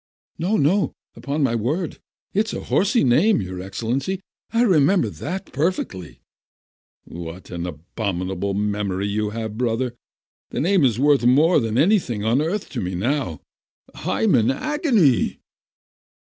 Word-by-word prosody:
"No, 190 +6 +1
no, 190 +6 +2 0.2
upon 145 +1 -2
my 130 -4 +2
word, 145 - -2 0.3
it's 215 +2 0
a - - -4
horsey 210 +5 +2
name, 160 - +4
your 95 -2 -5
Excellency, 120 - -2 0.3
I 230 +1 +3
remember 185 - +3
that 185 +5 -6
perfectly." 95 - -2 0.8
"What 85 +2 -9
an 85 0 -4
abominable 95 +3 -3
memory 100 -2 -1
you 105 +1 -1
have, 110 0 -5
brother! 120 0 0 0.6
That - - -3
name 180 +1 +3
is 120 -5 +3
worth 140 0 +3
more 150 +9 +5
than 115 -2 -1
anything 150 - +2
on 115 +6 +2
earth 185 +6 -2
to - - -4
me 90 0 -3
now! 115 - -1 0.5
I'm 220 -4 0
in 115 -3 +4
agony 220 - +2
125 Hz, 135 wpm, -22 LUFS, -, 0.8 s, more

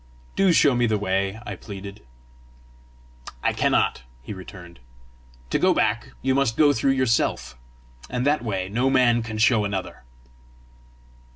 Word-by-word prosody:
"Do 195 -2 +3
show 145 -4 +4
me 120 -1 +2
the 110 -1 +1
way," 95 +1 -1
I - - -5
pleaded. 100 0 -9 1.4
"I - - +1
cannot," - - +1 0.2
he 105 - -7
returned. 90 -4 -12 0.7
"To - - +1
go - - +3
back, - - 0
you 130 0 +2
must 135 -4 +1
go 145 -2 +5
through 135 +2 +1
yourself, 130 - 0 0.5
and 125 +1 -2
that 145 -3 +1
way 95 -5 -2
no 120 +7 0
man 125 -3 +3
can 110 -1 -6
show 110 0 +3
another." 100 -2 -4
115 Hz, 145 wpm, -23 LUFS, 100-130 Hz, 1.4 s, go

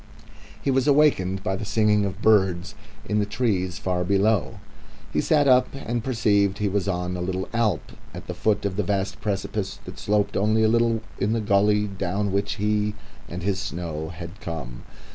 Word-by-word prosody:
He 140 - 0
was 135 +1 +2
awakened 120 -11 +3
by 95 - 0
the 95 - -5
singing 105 -1 +2
of 100 - -5
birds 95 -5 +3 0.3
in 105 0 +1
the 105 - +1
trees 100 -6 -1
far 90 +1 -1
below. 100 +2 +1 0.6
He 75 - +2
sat 145 -2 +3
up 125 -1 +5
and 120 -4 -3
perceived 100 -5 +2
he 105 - 0
was 100 0 -1
on 90 -1 -1
a 90 - -4
little 95 +1 -2
alp 110 -8 0 0.2
at - - -9
the - - -5
foot 110 -2 0
of 100 0 -2
a - - +5
vast 100 0 -2
precipice, 100 -1 -2
that - - -7
was - - -9
grooved 105 0 +2 0.9
by - - +1
the 115 +2 +1
gully 105 0 +3
down 100 0 -2
which 100 +1 0
he 105 0 0 0.3
and 90 0 -6
his 95 -1 0
snow 80 -2 -4
had 85 +3 -9
come. 65 -8 -6
100 Hz, 180 wpm, -24 LUFS, 90-105 Hz, 0.9 s, up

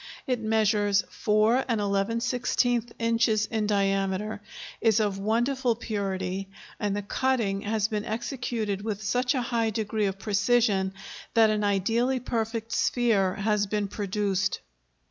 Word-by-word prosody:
It 250 -2 0
measures 215 -2 +2
4 215 +4 +2
11/16 230 +3 0
inches 230 -2 +2
in 215 -1 -1
diameter, 195 +1 0 0.4
is 225 -1 +4
of 205 -2 0
wonderful 240 +4 +1
purity, 195 -3 -3 0.3
and 205 -2 -1
the 205 - -3
cutting 220 -3 0
has 215 0 0
been 210 -2 -2
executed 225 -3 -3
with 215 -1 -4
such 250 +5 +1
a 255 - 0
high 230 -2 0
degree 215 -1 -1
of 195 0 -3
precision 200 -1 +1 0.4
that 225 -1 +6
an 210 -1 0
ideally 225 +6 +1
perfect 225 -1 -3
sphere 215 -8 +2
has 210 0 +1
been 210 0 -1
produced. 200 -1 -1
215 Hz, 125 wpm, -27 LUFS, 200-230 Hz, 0.4 s, that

